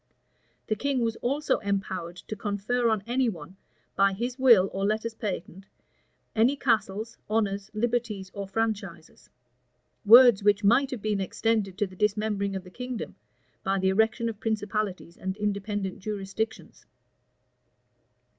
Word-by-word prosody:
The 215 Hz, -, 0 dB
king 275 Hz, +3 st, -1 dB
was 225 Hz, -1 st, 0 dB
also 285 Hz, +5 st, 0 dB
empowered 190 Hz, -4 st, -3 dB
to 180 Hz, +4 st, -7 dB
confer 210 Hz, +4 st, 0 dB
on 215 Hz, -3 st, 0 dB
any 245 Hz, +1 st, +1 dB
one, 180 Hz, -1 st, -9 dB, 0.4 s
by 195 Hz, 0 st, +4 dB
his 240 Hz, +6 st, -4 dB
will 235 Hz, -8 st, +6 dB
or 195 Hz, -, -2 dB
letters 215 Hz, +2 st, 0 dB
patent, 195 Hz, -3 st, -5 dB, 0.7 s
any 235 Hz, +5 st, +4 dB
castles, 225 Hz, -4 st, -1 dB
honors, 205 Hz, -2 st, 0 dB
liberties, 220 Hz, -4 st, -1 dB
or 200 Hz, -1 st, -5 dB
franchises; 220 Hz, +1 st, -4 dB, 0.7 s
words 235 Hz, 0 st, +8 dB
which 205 Hz, 0 st, +3 dB
might 245 Hz, +7 st, +4 dB
have 250 Hz, -6 st, -6 dB
been 210 Hz, -2 st, 0 dB
extended 200 Hz, 0 st, -1 dB
to 210 Hz, -, +1 dB
the 185 Hz, -1 st, -12 dB
dismembering 210 Hz, 0 st, 0 dB
of 190 Hz, -, -4 dB
the 180 Hz, -, -13 dB
kingdom, 250 Hz, +1 st, -6 dB, 0.5 s
by 195 Hz, 0 st, +1 dB
the 190 Hz, 0 st, +2 dB
erection 220 Hz, +4 st, +2 dB
of 220 Hz, -3 st, -5 dB
principalities 210 Hz, -5 st, -3 dB
and 190 Hz, +1 st, -4 dB
independent 205 Hz, -1 st, -2 dB
jurisdictions. 210 Hz, +2 st, -5 dB
210 Hz, 135 wpm, -27 LUFS, 195-230 Hz, 0.7 s, words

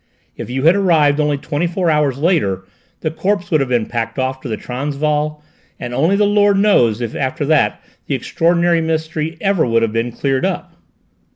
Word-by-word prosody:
If -, -, -7 dB
you 130 Hz, +2 st, -2 dB
had 165 Hz, +4 st, +5 dB
arrived 160 Hz, -7 st, +3 dB
only 150 Hz, -1 st, +1 dB
twenty 150 Hz, +4 st, -2 dB
four 175 Hz, -1 st, 0 dB
hours 150 Hz, -4 st, +1 dB
later 140 Hz, -, 0 dB, 0.4 s
the 155 Hz, -, -1 dB
corpse 190 Hz, +2 st, -2 dB
would 155 Hz, -, +3 dB
have 135 Hz, -2 st, -1 dB
been 120 Hz, -3 st, +1 dB
packed 115 Hz, 0 st, -4 dB
off 130 Hz, 0 st, -2 dB
to -, -, -7 dB
the 110 Hz, -2 st, -3 dB
Transvaal, 150 Hz, +3 st, -2 dB, 0.4 s
and 120 Hz, -, -6 dB
only 160 Hz, +10 st, +2 dB
the 205 Hz, +1 st, +3 dB
Lord 205 Hz, -1 st, +3 dB
knows 125 Hz, -, +3 dB
if 115 Hz, -2 st, -3 dB
after 135 Hz, +2 st, -2 dB
that 155 Hz, 0 st, +2 dB, 0.3 s
the -, -, 0 dB
extraordinary 170 Hz, 0 st, +1 dB
mystery 160 Hz, 0 st, -2 dB
ever 195 Hz, -4 st, +2 dB
would 115 Hz, -1 st, +2 dB
have 110 Hz, -1 st, -1 dB
been 115 Hz, +1 st, -1 dB
cleared 135 Hz, +2 st, -1 dB
up." -, -, -3 dB
150 Hz, 190 wpm, -17 LUFS, 130-170 Hz, 0.4 s, had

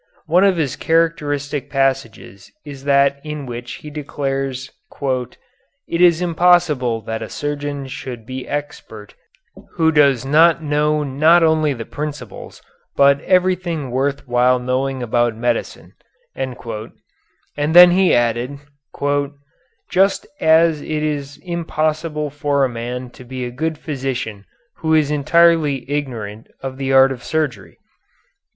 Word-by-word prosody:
One 175 Hz, +4 st, +3 dB
of 195 Hz, -3 st, +3 dB
his 145 Hz, -5 st, -1 dB
characteristic 150 Hz, -4 st, -1 dB
passages 135 Hz, -8 st, -2 dB
is 140 Hz, -2 st, -10 dB
that 140 Hz, 0 st, +3 dB
in 150 Hz, -2 st, -6 dB
which 120 Hz, -1 st, -7 dB
he 150 Hz, -, -7 dB
declares 135 Hz, -3 st, -4 dB, 0.3 s
"it 130 Hz, -4 st, -2 dB, 0.6 s
is 175 Hz, -1 st, +5 dB
impossible 165 Hz, -9 st, +2 dB
that 110 Hz, +1 st, -5 dB
a -, -, -6 dB
surgeon 145 Hz, -1 st, -4 dB
should 125 Hz, -3 st, -8 dB
be 130 Hz, +2 st, -7 dB
expert 145 Hz, -8 st, -6 dB, 0.6 s
who 160 Hz, -1 st, +2 dB
does 140 Hz, -5 st, +3 dB
not 160 Hz, +3 st, +4 dB
know 150 Hz, 0 st, +1 dB
not 155 Hz, +5 st, +4 dB
only 160 Hz, -2 st, +3 dB
the 115 Hz, -2 st, -7 dB
principles, 145 Hz, -7 st, -7 dB, 0.3 s
but 140 Hz, 0 st, +4 dB
everything 180 Hz, -6 st, 0 dB
worth 140 Hz, +2 st, -1 dB
while 125 Hz, +1 st, +3 dB
knowing 130 Hz, +1 st, -2 dB
about 120 Hz, 0 st, +1 dB
medicine," 115 Hz, +1 st, -3 dB, 0.4 s
and 130 Hz, -1 st, -4 dB, 1.0 s
then 165 Hz, +5 st, +7 dB
he 185 Hz, 0 st, +4 dB
added, 120 Hz, +3 st, 0 dB, 1.3 s
"just 195 Hz, +2 st, +2 dB
as 160 Hz, -1 st, +4 dB
it -, -, -10 dB
is 145 Hz, -2 st, -3 dB
impossible 155 Hz, -3 st, -2 dB
for 140 Hz, -1 st, +1 dB
a -, -, +1 dB
man 120 Hz, +1 st, -6 dB
to 130 Hz, -, -13 dB
be 125 Hz, 0 st, -6 dB
a 120 Hz, -, -5 dB
good 155 Hz, +5 st, -3 dB
physician 125 Hz, -9 st, -4 dB, 0.3 s
who 160 Hz, 0 st, +1 dB
is 150 Hz, -2 st, +2 dB
entirely 150 Hz, -1 st, +3 dB
ignorant 115 Hz, -7 st, -4 dB
of 130 Hz, -1 st, -6 dB
the 135 Hz, -1 st, -1 dB
art 135 Hz, 0 st, +6 dB
of 125 Hz, -2 st, -7 dB
surgery." 155 Hz, -6 st, -3 dB
140 Hz, 130 wpm, -19 LUFS, 130-155 Hz, 1.3 s, then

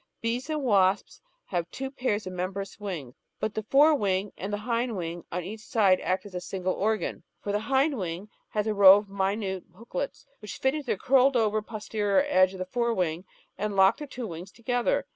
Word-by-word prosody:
Bees 235 Hz, +5 st, -2 dB
and 305 Hz, -2 st, -1 dB
wasps 195 Hz, -4 st, +2 dB, 0.2 s
have 175 Hz, -2 st, -2 dB
two 270 Hz, 0 st, -5 dB
pairs 220 Hz, -6 st, -1 dB
of 185 Hz, -, -6 dB
membranous 190 Hz, +3 st, -4 dB
wings, 170 Hz, -12 st, -5 dB, 0.3 s
but 215 Hz, -, -2 dB
the 220 Hz, -, -2 dB
for^ 285 Hz, +8 st, +5 dB
wing 195 Hz, -4 st, 0 dB
and 195 Hz, +2 st, -5 dB
the 205 Hz, -, -1 dB
hind 230 Hz, +1 st, -1 dB
wing 170 Hz, -1 st, -5 dB
on 180 Hz, +1 st, -2 dB
each 210 Hz, +5 st, -7 dB
side 205 Hz, -4 st, +3 dB
act 185 Hz, +3 st, -1 dB
as 200 Hz, -, -11 dB
a 180 Hz, -, -4 dB
single 185 Hz, 0 st, -2 dB
organ, 215 Hz, +2 st, -1 dB, 0.2 s
for 205 Hz, -, -4 dB
the 205 Hz, -, +1 dB
hind 270 Hz, +4 st, +1 dB
wing 180 Hz, +2 st, -4 dB, 0.2 s
has 210 Hz, -1 st, -1 dB
a 215 Hz, -, 0 dB
row 200 Hz, -1 st, +9 dB
of 205 Hz, -1 st, -5 dB
minute 195 Hz, -1 st, -2 dB
booklets 230 Hz, +8 st, -6 dB
which 210 Hz, -, -8 dB
fit 265 Hz, 0 st, +1 dB
into 300 Hz, -3 st, -5 dB
the 210 Hz, -, 0 dB
curled 265 Hz, +3 st, +4 dB
over 215 Hz, -1 st, +2 dB
posterior 210 Hz, +2 st, 0 dB
edge 185 Hz, -8 st, +4 dB
of -, -, -7 dB
the 185 Hz, -, -3 dB
fore 235 Hz, +4 st, 0 dB
wing 175 Hz, -1 st, -1 dB, 0.3 s
and 210 Hz, 0 st, -2 dB
lock 190 Hz, 0 st, +5 dB
the 295 Hz, -, -7 dB
two 250 Hz, -3 st, -6 dB
wings 175 Hz, 0 st, -7 dB
to 235 Hz, -, -20 dB
gether. 245 Hz, 0 st, +1 dB
205 Hz, 215 wpm, -27 LUFS, 185-235 Hz, 0.3 s, row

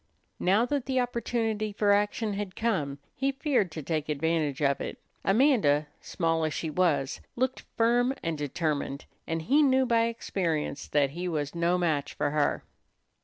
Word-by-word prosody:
Now 200 Hz, +6 st, +3 dB
that 275 Hz, 0 st, -2 dB
the 260 Hz, -1 st, +1 dB
opportunity 230 Hz, -3 st, -1 dB
for 205 Hz, 0 st, +2 dB
action 205 Hz, +1 st, +1 dB
had 195 Hz, -2 st, -4 dB
come, 155 Hz, -12 st, -1 dB, 0.2 s
he 275 Hz, +1 st, 0 dB
feared 270 Hz, -, +1 dB
to 155 Hz, -, -5 dB
take 155 Hz, 0 st, -2 dB
advantage 150 Hz, -1 st, 0 dB
of 140 Hz, -2 st, +1 dB
it. -, -, -5 dB, 0.3 s
Amanda, 195 Hz, -, +3 dB
small 165 Hz, -2 st, -1 dB
as 155 Hz, -4 st, -1 dB
she 160 Hz, +2 st, -3 dB
was, 150 Hz, -6 st, +1 dB
looked 260 Hz, +1 st, -1 dB
firm 240 Hz, +2 st, +3 dB
and 165 Hz, -1 st, -1 dB
determined, 145 Hz, -1 st, -2 dB, 0.2 s
and 165 Hz, 0 st, -2 dB
he 280 Hz, -, +4 dB
knew 265 Hz, -2 st, +4 dB
by 230 Hz, -2 st, +3 dB
experience 170 Hz, -10 st, -2 dB
that 145 Hz, -2 st, +2 dB
he 175 Hz, +4 st, -4 dB
was 150 Hz, -4 st, -2 dB
no 170 Hz, +1 st, +1 dB
match 155 Hz, -5 st, -1 dB
for -, -, 0 dB
her. 150 Hz, -1 st, +1 dB
180 Hz, 165 wpm, -28 LUFS, 150-230 Hz, 0.3 s, he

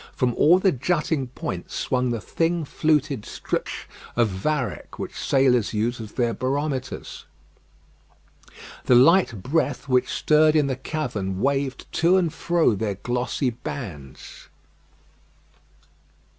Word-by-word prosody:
From 125 Hz, -1 st, +1 dB
all 165 Hz, +9 st, +5 dB
the 190 Hz, 0 st, +3 dB
jutting 150 Hz, -1 st, -1 dB
points 95 Hz, -7 st, -6 dB
swung 125 Hz, -1 st, 0 dB
the 120 Hz, -1 st, -1 dB
thin 165 Hz, +7 st, -1 dB
fluted 145 Hz, -5 st, 0 dB
strips -, -, -4 dB, 0.3 s
of 120 Hz, -2 st, +3 dB
varech, 125 Hz, +8 st, -3 dB
which -, -, -5 dB
sailors 125 Hz, -5 st, +2 dB
use 115 Hz, +3 st, -1 dB
as 110 Hz, -2 st, -9 dB
their 120 Hz, -2 st, 0 dB
barometers. 135 Hz, +1 st, -3 dB, 1.6 s
The 125 Hz, -, +5 dB
light 130 Hz, -, +4 dB
breath 145 Hz, -, -1 dB
which 125 Hz, -1 st, +2 dB
stirred 155 Hz, 0 st, +3 dB
in 150 Hz, -2 st, +4 dB
the 135 Hz, -1 st, -1 dB
cavern 120 Hz, -10 st, -3 dB
waved 135 Hz, +1 st, -1 dB, 0.2 s
to 175 Hz, +3 st, +5 dB
and 170 Hz, -4 st, +1 dB
fro 170 Hz, -7 st, +2 dB
their 105 Hz, 0 st, -2 dB
glossy 125 Hz, +4 st, -1 dB
bands. 90 Hz, -, -8 dB
130 Hz, 120 wpm, -24 LUFS, 120-155 Hz, 1.6 s, all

